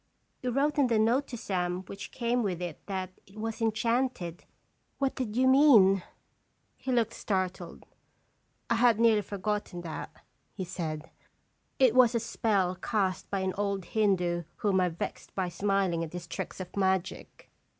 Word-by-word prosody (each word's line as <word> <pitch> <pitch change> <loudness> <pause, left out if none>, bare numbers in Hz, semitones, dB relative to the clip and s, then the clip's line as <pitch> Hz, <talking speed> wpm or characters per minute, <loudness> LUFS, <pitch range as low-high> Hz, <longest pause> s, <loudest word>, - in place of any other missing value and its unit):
" - - -45
You 250 - -1
wrote 285 +4 +1
in 275 - +5
the 230 -2 +2
note 235 +6 +2
to 240 - -6
Sam 180 -3 -2
which 195 +1 -8
came 245 0 0
with 190 -6 -1
it 175 -4 -6
that 190 -2 -3 0.2
it 195 +3 -17
was 225 +1 -4
enchanted. 225 -5 0 0.5
What 275 -1 0
did 235 -5 -4
you 260 +1 +4
mean?" 240 -9 +6 0.7
He 260 - -4
looked 235 -3 +2
startled. 185 -3 -3 0.4
" - - -44
I 230 - +3
had 235 -2 +4
nearly 225 -2 +5
forgot 205 +1 -2
ten 175 -2 -8
that," 165 -2 -6 0.4
he 190 - -4
said. 160 -3 -5 0.3
" - - -44 0.3
It 255 -4 +5
was 250 -2 +5
a - - +3
spell 205 -5 0
cast 195 -5 -1
by 195 -1 -1
an 190 0 -1
old 200 -2 -1
Hindoo 180 -5 +1
whom 195 -3 +1
I 180 - +2
vexed 165 - -6
by 185 -2 -1
smiling 190 -2 0
at 160 - -7
his 175 -1 -6
tricks 170 - -6
of 185 -1 -7
magic." 190 -2 -2
200 Hz, 175 wpm, -29 LUFS, 180-235 Hz, 0.7 s, mean